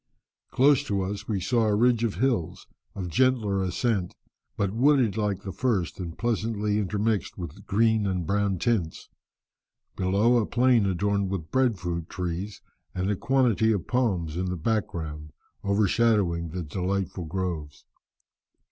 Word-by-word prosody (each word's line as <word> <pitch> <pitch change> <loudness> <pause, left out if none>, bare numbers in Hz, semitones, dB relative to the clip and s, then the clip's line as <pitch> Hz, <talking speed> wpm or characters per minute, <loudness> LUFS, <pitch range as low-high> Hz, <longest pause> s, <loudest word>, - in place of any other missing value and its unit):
Close 140 +1 +4
to 100 -7 -1
us 100 +2 -5
we 105 -3 -1
saw 115 +4 +1
a 105 - +2
ridge 120 +1 +3
of 115 -4 0
hills, 115 -6 -1 0.3
of 95 -3 -4
gentler 110 -1 +2
ascent, 95 0 -1 0.4
but 100 -2 0
wooded 125 -3 +3
like 105 -3 -1
the 95 - -5
first, 95 - -1
and 85 -3 -6
pleasantly 105 -2 0
intermixed 105 +1 -1
with 95 +3 -8
green 110 0 +2
and 90 -3 -1
brown 100 +1 0
tints; 95 -5 -1 0.9
below, 100 +6 +3
a 115 - +2
plain 120 -3 +3
adorned 100 +1 0
with 90 -5 -4
breadfruit 90 -11 0
trees, 90 +3 -4 0.3
and 95 +2 0
a - - +1
quantity 120 -2 +2
of 100 -6 -1
palms 95 -11 0
in 90 - -1
the 90 0 -2
background, 80 -6 -3 0.3
overshadowing 100 -4 +2
the 90 +2 -4
delightful 90 +2 -3
groves. 80 -4 -4
100 Hz, 140 wpm, -26 LUFS, 90-115 Hz, 0.9 s, Close